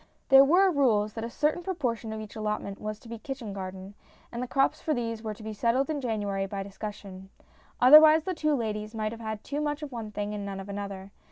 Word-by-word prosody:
There 270 0 +9
were 365 +7 +5
rules 220 -8 +2
that 225 - -5
a 230 - -3
certain 300 +7 0
proportion 250 - -3
of 220 - -5
each 215 -1 -9
allotment 210 -2 -3
was 215 0 -4
to 230 - -16
be 230 -1 -7
kitchen 265 -6 -6
garden, 190 0 -7 0.4
and 235 - -4
the 250 - -3
crops 270 +2 +1
for 310 - 0
these 230 -2 -3
were 215 -2 -5
to 215 - -13
be 220 0 -5
settled 240 +7 +1
in 290 -2 -2
January 205 -5 -2
by 195 0 -4
discussion. 195 -1 -8 0.5
Otherwise, 305 +4 +8
the 370 - -2
two 305 -3 +1
ladies 215 -2 -3
might 215 -1 -2
have 230 0 -9
had 220 -1 -5
too 290 +1 -3
much 295 0 -2
of 290 - -6
one 230 -3 -5
thing 205 0 -3
and 205 -1 -4
none 195 -1 -5
of 195 +1 -8
another. 200 -1 -6
220 Hz, 235 wpm, -28 LUFS, 205-275 Hz, 0.5 s, There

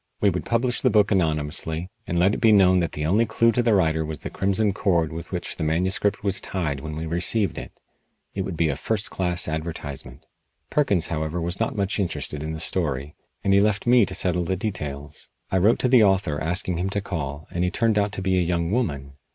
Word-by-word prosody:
We 100 - +3
would 90 - -4
publish 120 +1 0
the 130 - +3
book 105 -2 +3
anonymously, 80 0 -1 0.2
and 85 - -1
let 95 +4 +3
it - - -3
be 115 - +6
known 95 -3 +5
that 85 -3 -1
the 75 - -3
only 105 +8 +2
clue 115 +2 +3
to 120 - +1
the 115 -3 +3
writer 80 -4 +2
was 80 0 -4
the - - -7
crimson 100 +1 +1
cord 85 -6 +1
with 80 0 -7
which - - -4
the - - -3
manuscript 95 +6 0
was 100 -2 +1
tied 80 -8 -2
when 75 +2 -6
we 80 +1 -4
received 90 +6 +1
it. - - -11 0.5
It 100 - -2
would 95 -3 -4
be 85 - +2
a 70 - -1
first 105 +8 -2
class 90 -2 -1
advertisement. 80 -3 -5 0.5
Perkins, 100 - +1
however, 80 +1 -2
was 85 +2 0
not 115 - -1
much 100 0 -1
interested 85 -5 -3
in 80 +1 -4
the 80 - -5
story, 75 -4 -1 0.3
and 100 - +2
he 100 - +6
left 105 0 +1
me 120 -1 +6
to - - -1
settle 90 -1 +1
the 95 +3 -1
details. 75 -7 -5 0.2
I 95 - +2
wrote 105 +6 +4
to - - +1
the 125 -3 +6
author 95 -7 +1
asking 85 +1 0
him 90 +3 -1
to 100 +1 -1
call, 75 -6 -5
and 90 - -1
he 90 - +2
turned 110 +1 +1
out 100 0 0
to 95 - -4
be 95 -1 +2
a - - +2
young 85 0 -1
woman. 70 - -2
90 Hz, 230 wpm, -24 LUFS, 80-100 Hz, 0.5 s, be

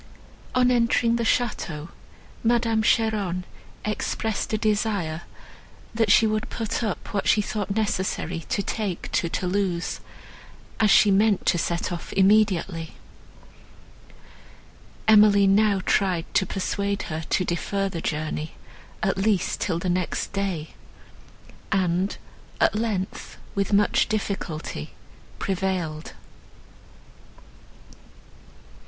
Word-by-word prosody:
On 250 0 +4
entering 235 -1 +3
the 235 - -1
château, 185 -10 -1 0.5
Madame 230 -1 +2
Cheron 210 -5 +1 0.4
expressed 215 0 -2
a 215 - +1
desire, 205 -7 0 0.7
that 225 -2 +2
she 225 - +6
would 215 0 -1
put 225 0 -3
up 210 -5 -4
what 200 - -1
she 220 - +5
thought 210 -1 -2
necessary 185 -5 -1
to 200 - 0
take 200 -6 -3
to 170 - 0
Thoulouse, 180 -1 -1 0.8
as 215 - +4
she 205 +1 +6
meant 205 0 +3
to 175 - +3
set 170 +2 -1
off 175 - -6
immediately. 190 -4 +2 2.1
Emily 210 -2 +7
now 200 0 +3
tried 180 -4 +1
to 190 - +2
persuade 200 +1 -2
her 160 -1 -4
to 185 - +1
defer 195 +4 -1
the 175 -4 -5
journey, 155 0 -3 0.5
at 195 -1 +1
least 200 -2 +1
till 170 -4 0
the 170 - -3
next 180 +1 -1
day, 190 -6 -2 1.0
and, 185 0 +1 0.4
at - - +4
length, 210 -4 -3 0.2
with 200 +1 -1
much 205 +3 +3
difficulty, 180 - -4 0.4
prevailed. 180 -5 -2
200 Hz, 110 wpm, -25 LUFS, 180-215 Hz, 2.1 s, Emily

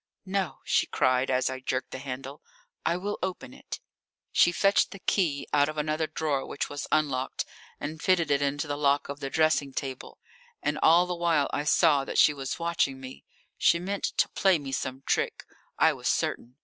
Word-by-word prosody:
"No," 190 -7 -2
she - - +2
cried, 130 +1 +1
as 130 0 +2
I 130 0 -3
jerked 130 0 -3
the 130 - -6
handle. 135 +1 -7 0.4
"I 170 +1 +1
will 205 +3 -4
open 180 -9 -4
it." - - -8 0.5
She 175 - +5
fetched 195 +3 +3
the - - -9
key 165 -8 0
out 145 0 +4
of 155 - -6
another 155 +1 0
drawer 150 -3 -1
which - - -4
was 145 0 -5
unlocked, 135 -4 0 0.3
and 155 +1 -5
fitted 170 -5 +2
it 140 0 +3
into 145 +1 0
the 145 -1 -3
lock 140 -1 +2
of 140 0 -5
the 135 -1 -4
dressing 155 -3 +2
table. 130 -1 -5 0.5
And 150 0 0
all 170 +2 +6
the 180 - -3
while 170 -4 +1
I 145 - -1
saw 150 -3 +4
that - - -4
she 150 - +6
was 135 -2 -4
watching 170 -5 0
me. 130 0 -10 0.3
She - - +5
meant 195 +3 -3
to - - +4
play 190 -3 +3
me 140 -3 -7
some 130 0 -3
trick, - - -1 0.3
I - - +5
was - - -5
certain. 120 +2 -1
145 Hz, 195 wpm, -28 LUFS, 135-170 Hz, 0.5 s, all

